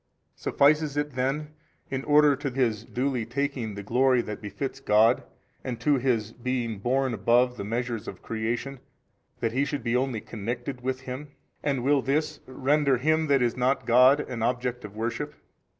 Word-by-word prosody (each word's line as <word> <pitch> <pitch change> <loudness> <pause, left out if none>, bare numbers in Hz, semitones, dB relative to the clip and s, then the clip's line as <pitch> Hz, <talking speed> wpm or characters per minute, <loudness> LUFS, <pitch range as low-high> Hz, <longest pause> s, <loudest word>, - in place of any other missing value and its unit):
A. - - -26
Suffices 145 0 +3
it 145 0 -1
then 140 +4 -2 0.4
in 135 0 -2
order 150 -1 +5
to 140 +1 -3
his 115 -4 0
duly 125 -1 -1
taking 125 -2 -3
the 100 - -6
glory 125 +3 +3
that 105 - -6
befits 130 +6 -5
God 110 0 +4 0.4
and 125 -3 -4
to 145 -2 +3
his 115 -4 0
being 120 -3 -3
borne 130 +4 +1
above 125 +2 +3
the 110 - -5
measures 115 +1 -3
of - - -8
creation, 115 +4 -3 0.6
that 115 - +1
he 130 +4 +1
should 140 -3 -3
be 115 0 0
only 125 -3 0
connected 120 +4 -5
with 130 +1 -2
Him, 130 +3 -6 0.3
and 135 -4 -1
will 140 +1 +3
this 150 +3 -1
render 135 +1 +2
him 155 +4 +1
that 140 -3 +3
is 120 -1 +1
not 130 +2 +1
God 125 +4 +6
an 125 -5 -5
object 125 +1 -1
of 105 0 -9
worship? 120 +7 -3
125 Hz, 175 wpm, -27 LUFS, 115-140 Hz, 0.6 s, God